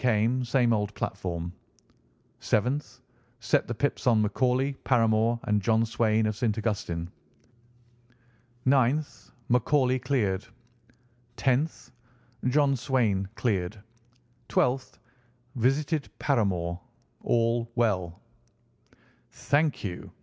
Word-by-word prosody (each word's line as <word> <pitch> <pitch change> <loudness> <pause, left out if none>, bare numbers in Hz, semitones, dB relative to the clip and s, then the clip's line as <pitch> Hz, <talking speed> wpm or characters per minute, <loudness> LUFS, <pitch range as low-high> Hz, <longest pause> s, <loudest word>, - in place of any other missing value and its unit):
Same 120 +1 +2
old 105 -1 -1
platform. 85 -2 -4 0.9
"7th. 125 +7 -1 0.4
Set - - +1
the - - -3
pips - - -1
on 110 -3 +4
McCauley, 130 +5 +1
Paramore, 115 -1 +2
and 105 -1 +1
John 110 +2 +2
Swain 110 -1 +1
of 110 -1 -1
St. 110 0 -1
Augustine. 90 -6 -3 1.5
"9th. 135 +3 +1 0.2
McCauley 130 +1 +2
cleared. 105 -9 0 0.9
"10th. 130 +1 0 0.5
John 140 +1 +3
Swain 115 -7 0
cleared. 100 -4 -1 0.7
"12th. 130 +1 0 0.6
Visited 140 +5 0
Paramore. 90 - 0 0.4
All 115 0 +1
well." 95 -8 0 1.1
"Thank 150 +1 0
you!" 90 -4 -6
115 Hz, 90 wpm, -27 LUFS, 105-130 Hz, 1.5 s, on